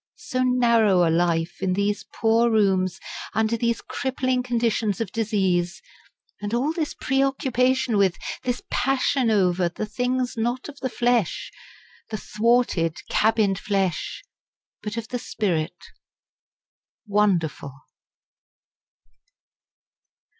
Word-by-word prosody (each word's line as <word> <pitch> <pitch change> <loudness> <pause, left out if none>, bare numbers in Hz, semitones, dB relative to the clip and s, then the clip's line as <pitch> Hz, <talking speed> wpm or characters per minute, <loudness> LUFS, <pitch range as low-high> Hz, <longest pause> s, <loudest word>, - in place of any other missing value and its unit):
So 255 - -3
narrow 235 -8 +4
a - - +2
life, 170 0 0
in 190 -1 +1
these 200 +2 -1
poor 230 +1 +3
rooms, 190 -4 +2 0.4
under 220 +1 +2
these 235 0 0
crippling 260 -1 -1
conditions 230 -4 0
of 225 -5 -3
disease! 190 -6 0 0.6
and 205 +2 -2
all 275 +6 0
this 320 -3 -3
preoccupation 260 -2 +1
with, 195 -3 +3 0.2
this 245 0 -2
passion 270 -1 +1
over, 180 -4 +2
the 195 +5 -4
things 250 +3 -1
not 240 +3 -2
of 290 -1 -11
the 260 - -2
flesh, 240 -6 0 0.6
the 215 - -3
thwarted, 210 -7 +1
cabined 210 -3 +2
flesh, 195 - -1 0.6
but 210 +1 -5
of 225 0 -5
the 245 - -3
spirit 180 -8 -2 1.3
wonderful! 195 -9 +1
220 Hz, 110 wpm, -24 LUFS, 190-250 Hz, 1.3 s, narrow